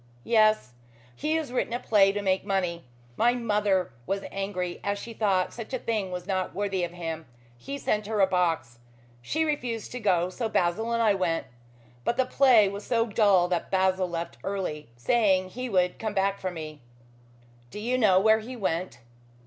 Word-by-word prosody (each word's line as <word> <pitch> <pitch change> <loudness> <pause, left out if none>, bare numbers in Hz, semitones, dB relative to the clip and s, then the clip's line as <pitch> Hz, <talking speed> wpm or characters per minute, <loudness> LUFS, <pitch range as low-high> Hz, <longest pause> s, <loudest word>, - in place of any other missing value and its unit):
"Yes. 215 - +3 0.4
He 305 +2 -1
has 315 -6 -2
written 245 -1 -1
a 240 - -1
play 200 -5 +4
to 205 0 -3
make 190 -1 +1
money. 180 -5 -1 0.3
My 240 +1 +3
mother 210 -5 +1 0.2
was 195 0 -1
angry, 190 -3 -3
as 200 0 -1
she 230 +3 -8
thought 195 -4 +1
such 235 +3 -5
a - - 0
thing 215 -5 -2
was 180 -1 -5
not 190 -1 -2
worthy 195 -2 -1
of 175 - -1
him. 165 -2 -6 0.3
He 275 - -6
sent 210 -6 -1
her 215 -1 -1
a 195 - +7
box. 165 -10 -1 0.4
She 315 - 0
refused 245 -8 -3
to 250 - -5
go, 185 -5 +1
so 225 +3 -3
Basil 215 +4 0
and 230 0 +1
I 215 -2 +4
went. 180 -4 -1 0.6
But 235 - 0
the 260 - +3
play 255 -5 +5
was 200 +1 -5
so 230 -2 +1
dull 200 -5 +3
that 175 -2 -1
Basil 185 -1 +1
left 170 0 -5
early, 180 -9 -4
saying 190 - +2
he 250 +5 -5
would 180 -3 +1
come 220 -2 -3
back 195 0 +1
for 185 - -2
me." 155 -4 -8 0.9
"Do - - -9
you 240 +4 -1
know 205 -7 +5
where 220 +2 +4
he 240 +4 -8
went?" 180 - -2
195 Hz, 190 wpm, -27 LUFS, 180-225 Hz, 0.9 s, a